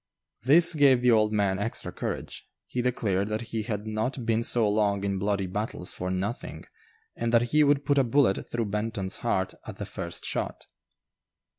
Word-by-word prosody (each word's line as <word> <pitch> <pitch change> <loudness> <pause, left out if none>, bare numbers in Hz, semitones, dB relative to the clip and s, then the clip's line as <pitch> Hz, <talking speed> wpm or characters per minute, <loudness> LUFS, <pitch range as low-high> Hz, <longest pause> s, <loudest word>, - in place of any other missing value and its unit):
This 165 +8 +6
gave 140 -5 +4
the 125 - +5
old 110 -1 +3
man 100 -2 +1
extra 110 +3 -3
courage; - - -6 0.2
he 125 - -3
declared 105 -6 0
that 110 +1 -2
he 110 - 0
had 105 -1 -4
not 110 +4 -3
been 115 0 +1
so 115 -1 +2
long 105 -1 +1
in 100 -1 -1
bloody 100 0 0
battles 95 -1 -3
"for 90 - -4
nothing," 95 +6 -4 0.5
and 115 - -2
that 120 0 +2
he 150 0 +6
would 145 -1 +2
put 145 -1 +3
a - - +4
bullet 120 -4 +1
through 120 -1 -1
Benton's 105 -2 -2
heart - - -1
at - - -8
the - - -5
first - - -6
shot. - - -3
110 Hz, 180 wpm, -27 LUFS, 100-125 Hz, 0.5 s, This